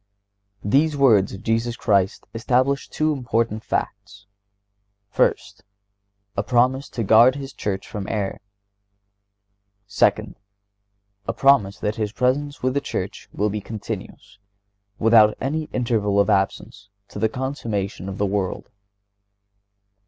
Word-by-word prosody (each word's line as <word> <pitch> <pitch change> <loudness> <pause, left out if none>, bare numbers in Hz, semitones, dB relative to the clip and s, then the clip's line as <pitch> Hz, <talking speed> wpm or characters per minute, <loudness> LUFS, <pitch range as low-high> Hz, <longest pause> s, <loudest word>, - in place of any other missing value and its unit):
These 145 +8 +2
words 115 -8 +4
of 100 +3 -9
Jesus 115 +1 0
Christ 100 -5 +1
establish 130 +4 0
two 155 0 0
important 115 -4 -1
facts: 100 0 -4 0.9
First—A 100 0 -4
promise 125 +5 +1
to 115 - -3
guard 115 +5 +6
His 135 -1 -7
Church 100 -1 -4
from 100 -2 -6
error. 100 -3 -3 1.4
Second—A 100 0 -4
promise 135 -8 +3
that 105 +1 -3
His 105 -2 -2
presence 140 +4 -1
with 130 0 +1
the 140 - 0
Church - - -5
will 105 0 -1
be 105 0 -3
continuous, 100 -2 -8 0.6
without 110 -1 +5
any 155 +4 -2
interval 110 -7 0
of 100 - +3
absence, 95 +1 -1 0.2
to - - -8
the 110 - +2
consummation 110 -7 -4
of 95 - -6
the 100 - +1
world. 95 -2 -3
105 Hz, 115 wpm, -22 LUFS, 100-125 Hz, 1.4 s, guard